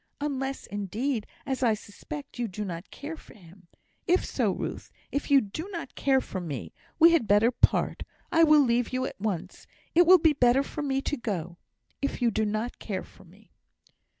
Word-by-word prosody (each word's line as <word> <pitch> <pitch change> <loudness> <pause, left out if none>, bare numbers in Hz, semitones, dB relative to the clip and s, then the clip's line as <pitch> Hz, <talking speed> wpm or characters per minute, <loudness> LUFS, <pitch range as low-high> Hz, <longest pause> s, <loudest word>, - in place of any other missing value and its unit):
Unless, 275 -2 -3
indeed, 210 +4 -3 0.2
as 265 -2 -2
I 230 -4 +3
suspect, 270 +7 -9
you 240 - 0
do 210 +1 -5
not 175 0 -6
care 300 +3 -7
for - - -16
him. 180 -2 -17 0.4
If 360 +1 +3
so, - - 0
Ruth! - - -5 0.2
if 285 - -2
you 280 -1 +6
do 310 - -6
not 335 -7 -6
care 270 -1 +2
for 185 - -5
me, 145 -8 -6 0.2
we 335 +1 +8
had 320 -10 +2
better 205 +4 +5
part - - +2 0.3
I 330 0 +5
will 305 -2 +7
leave 240 -2 +1
you 255 0 -1
at 195 - -7
once; 200 -6 -4 0.3
it 345 +1 +5
will 370 +1 +9
be 320 -2 +4
better 255 0 +4
for 300 - -6
me 270 -2 -1
to 295 - -2
go, 175 -7 -4 0.4
if 280 - -2
you 240 -2 +2
do 220 +1 0
not 215 +3 -3
care 190 -4 -4
for - - -18
me." 195 +5 -21
245 Hz, 195 wpm, -27 LUFS, 205-285 Hz, 0.4 s, will